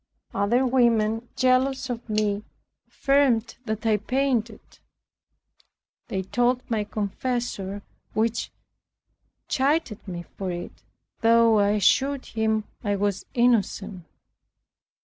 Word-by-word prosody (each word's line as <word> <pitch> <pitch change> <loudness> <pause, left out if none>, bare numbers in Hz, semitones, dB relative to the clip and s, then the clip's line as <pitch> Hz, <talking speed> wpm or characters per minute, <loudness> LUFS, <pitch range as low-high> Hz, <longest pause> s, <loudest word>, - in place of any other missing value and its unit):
Other 230 +6 +2
women, 235 -2 +2
jealous 260 +1 +2
of 240 -2 -6
me, 210 -1 0 0.4
affirmed 270 -5 +2
that 220 -1 -3
I 220 -1 +3
painted; 235 -1 0 1.5
they 190 -1 -2
told 245 +5 +1
my 215 -2 0
confessor, 205 -1 -3 0.3
who 220 +1 +3 1.2
chided 270 -6 0
me 175 -2 -5 0.2
for 190 -2 -2
it, 175 0 -7 0.4
though 230 -1 +5
I 205 0 +3
assured 270 +7 +2
him 220 -1 0 0.2
I 205 -2 0
was 200 -1 -1
innocent. 210 -6 +1
225 Hz, 100 wpm, -25 LUFS, 205-250 Hz, 1.5 s, though